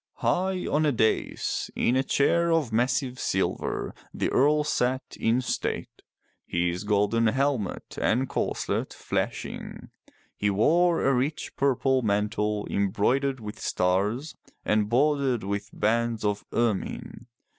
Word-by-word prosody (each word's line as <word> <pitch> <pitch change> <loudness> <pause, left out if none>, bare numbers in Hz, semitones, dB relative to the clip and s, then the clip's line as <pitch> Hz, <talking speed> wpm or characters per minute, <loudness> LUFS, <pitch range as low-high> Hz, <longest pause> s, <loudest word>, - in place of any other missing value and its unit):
High 185 0 0
on 150 +2 +1
a - - +3
dais 110 -3 0
in 125 - +2
a 130 - +4
chair 170 +5 +2
of 155 -9 +1
massive 125 +2 0
silver - - -1 0.2
the - - -1
Earl 150 +3 +4
sat 130 -3 -1
in 115 +3 +2
state, 125 - -3 0.5
his 90 +2 -1
golden 105 +2 +2
helmet 130 -4 -1
and 130 +4 +2
corselet - - -2
flashing. - - -4 0.4
He 105 - 0
wore 165 - +3
a 135 - +4
rich 135 +5 -2
purple 135 -1 +2
mantle 105 0 0
embroidered 125 +8 +1
with 105 -1 -8
stars 100 +11 0 0.3
and 105 -1 +2
bordered 135 -2 +2
with 100 +1 -3
bands 115 0 0
of 105 0 -1
ermine. 115 +1 -2
120 Hz, 125 wpm, -26 LUFS, 105-140 Hz, 0.5 s, a